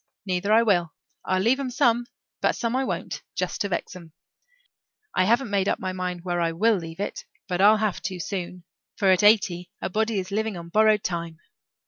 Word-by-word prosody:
Neither 190 +2 -1
I 225 +2 +6
will. 175 -7 +1 0.3
I'll 185 - +1
leave 250 +5 +3
'em 270 -2 -2
some, 240 -1 +2 0.3
but - - +2
some 235 +1 -2
I 265 - +1
won't, - - -4
just - - -2
to 200 - 0
vex 180 - -3
'em. 170 -3 -12 1.0
I 185 - +2
haven't 235 +2 +2
made 200 -1 +1
up - - +1
my 185 -1 -4
mind 180 -2 -4
where 175 -1 -1
I 165 -1 0
will 215 +5 +3
leave 165 0 -8
it 200 - -4 0.2
but 180 0 -1
I'll 210 +2 +7
have 215 -3 -1
to, 185 -2 -3
soon, 180 0 -5 0.3
for 195 -3 +3
at 185 - +4
eighty 200 -5 +3
a - - -4
body 220 +2 0
is 190 0 -3
living 215 -1 -1
on 170 0 -9
borrowed 215 +2 +4
time. 170 -2 -3
195 Hz, 205 wpm, -25 LUFS, 180-220 Hz, 1.0 s, I'll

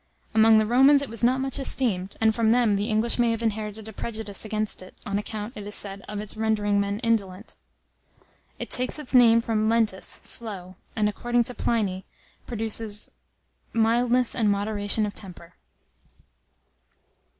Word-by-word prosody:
Among 220 0 +6
the 215 - +3
Romans 270 +5 +5
it 280 - -7
was 230 +1 -1
not 255 +2 +3
much 270 +1 -2
esteemed, 205 -9 +1
and 220 0 +3
from 225 -1 +1
them 230 -3 +3
the 205 +3 -2
English 225 +3 0
may 240 -1 +3
have 230 0 -2
inherited 215 -1 -3
a 220 - -9
prejudice 215 -2 -2
against 215 -2 -2
it, 185 - -13
on 200 0 -1
account, 210 +2 -6
it 205 -1 -8
is 205 - -2
said, 195 -1 -3
of 210 -1 -5
its 210 0 -6
rendering 210 -2 0
men 200 0 -1
indolent. 210 -4 -2 1.0
It - - -7
takes 255 +4 -1
its 295 -4 -5
name 230 -2 +6
from 220 -1 0
lentus 220 -5 0
'slow,' 190 -5 -3 0.2
and, 210 -1 +1
according 240 +3 0
to 250 - -3
Pliny, 200 -6 -1 0.4
produces 220 -2 0 0.6
mildness 235 +2 +2
and 220 -3 +1
moderation 205 +1 0
of 205 - -5
temper. 180 -3 -11
220 Hz, 160 wpm, -25 LUFS, 205-235 Hz, 1.0 s, Among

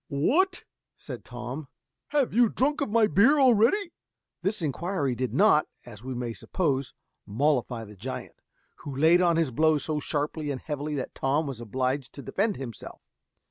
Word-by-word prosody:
"What!" 315 - +1 0.3
said - - -8
Tom, 125 +4 -7 0.4
"have 285 -3 +1
you 235 0 +5
drunk 290 +7 0
of 280 - 0
my 230 +1 +3
strong 210 - +2
beer 260 - +5
already?" 265 - +4 0.5
This 195 -2 -1
inquiry 150 -1 -1
did 125 +1 -2
not, 195 -7 +4 0.2
as 115 -3 -12
we 130 0 -5
may 120 -1 -3
suppose, 140 -3 -2 0.3
mollify 125 -1 0
the 105 0 -13
giant, 125 +7 -7 0.4
who 140 -2 -7
laid 160 +5 +5
on 170 -2 +3
his 165 -5 +1
blows 155 +2 +2
so 155 -1 -1
sharply 150 +1 -2
and 135 -2 -3
heavily 150 +1 -4
that 135 - -4
Tom 140 +4 0
was 135 -5 -6
obliged 130 +4 -2
to 140 - -9
defend 205 +1 0
himself. 125 -5 -8
150 Hz, 170 wpm, -27 LUFS, 130-200 Hz, 0.5 s, you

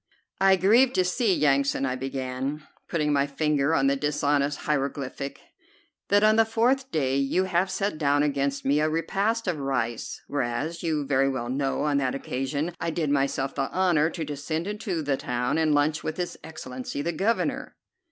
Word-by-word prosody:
"I 195 0 +6
grieve 230 +8 +4
to 185 - +2
see, 210 +4 +1
Yansan," 140 -1 +2
I 130 -1 -1
began, 135 +2 -4 0.3
putting 150 -3 +1
my 140 0 +2
finger 150 +1 +1
on 135 - +2
the 140 0 +3
dishonest 145 0 0
hieroglyphic, 140 -1 -3 0.7
"that 205 +1 +4
on 215 +1 +5
the 225 - +7
fourth 245 +4 +1
day 135 -3 +1
you 140 +7 +1
have 185 0 +1
set 195 -3 -2
down 145 -1 +3
against 140 -1 -1
me 140 +2 +3
a 155 +1 +2
repast 200 +7 -1
of 170 -5 -1
rice, 120 -4 -2
whereas 145 +5 -2
you 155 -4 -1
very 135 0 +2
well 120 -3 -3
know 135 +1 -1
on 145 -1 +1
that 130 -1 -1
occasion 140 +5 -3
I - - -1
did 155 -3 -1
myself 135 -1 0
the - - -2
honor 175 -4 +2
to 165 -2 -5
descend 150 +3 -3
into 205 -5 -3
the 140 -2 0
town 125 +5 -1
and 160 -1 +2
lunch 150 +1 +2
with 155 - -3
his 180 -1 -3
Excellency 140 -3 -6
the 170 - 0
Governor." 195 +8 -1
150 Hz, 180 wpm, -26 LUFS, 135-175 Hz, 0.7 s, the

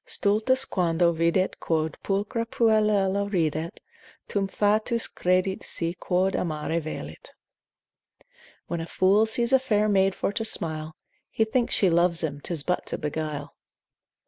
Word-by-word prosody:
Stultus 225 +6 +1
quando 170 -2 +1
videt 170 +3 0
quod 160 -1 -1
pulchra 205 +3 -1
puellula 210 -3 +2
ridet, 160 -3 -1 0.5
Tum 200 -1 -1
fatuus 215 +4 0
credit 185 +1 0
se 170 0 -3
quod 185 +2 0
amare 160 0 -2
velit: 80 - -8 1.3
When 170 -1 -4
a 165 - -6
fool 200 +5 +3
sees 235 +3 +1
a 265 - +6
fair 215 -5 +1
maid 195 -2 +2
for - - -1
to 225 - -2
smile, 155 -7 +1 0.3
He 220 - +1
thinks 235 +2 0
she 190 -4 +4
loves 170 0 +2
him, 145 -2 -3
'tis 160 -3 -2
but 180 - -2
to - - -1
beguile. 150 -1 -4
185 Hz, 140 wpm, -25 LUFS, 165-210 Hz, 1.3 s, a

